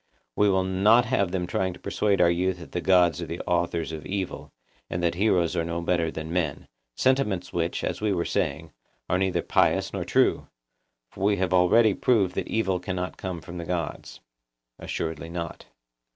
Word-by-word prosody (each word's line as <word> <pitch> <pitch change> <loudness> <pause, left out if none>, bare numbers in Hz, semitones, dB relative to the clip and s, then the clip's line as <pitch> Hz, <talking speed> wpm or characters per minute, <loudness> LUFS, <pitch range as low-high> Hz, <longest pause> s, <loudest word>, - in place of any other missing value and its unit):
We 105 0 +4
will 95 -1 +2
not 100 +6 +4
have 110 -6 +1
them 90 -1 -2
trying 95 +1 -1
to 90 - -14
persuade 100 0 0
our 85 - +6
youth 90 +1 0
that 85 - -11
the 90 - -2
gods 90 -3 +3
are - - -5
the - - -5
authors 85 -2 -1
of 80 -1 -6
evil, 95 +1 -4 0.4
and 85 - -3
that 85 - +2
heroes 90 -3 +2
are 85 - +1
no 85 +1 -3
better 85 -1 0
than 80 +1 -6
men—sentiments 90 - -1
which, 85 0 -1
as - - -3
we 105 -1 +1
were 85 -3 0
saying, - - -2 0.4
are 90 - +1
neither 95 -1 0
pious - - +2
nor - - -2
true, - - +2 0.6
for - - -7
we 100 +1 +3
have 90 0 0
already 100 +5 +5
proved 100 -4 +2
that - - -3
evil 95 -5 0
cannot 90 0 -4
come 90 -3 -5
from 85 +1 -8
the - - -4
gods. 85 -3 -4 0.6
Assuredly 80 0 -4
not. 85 -1 -6
90 Hz, 185 wpm, -26 LUFS, 85-95 Hz, 0.6 s, our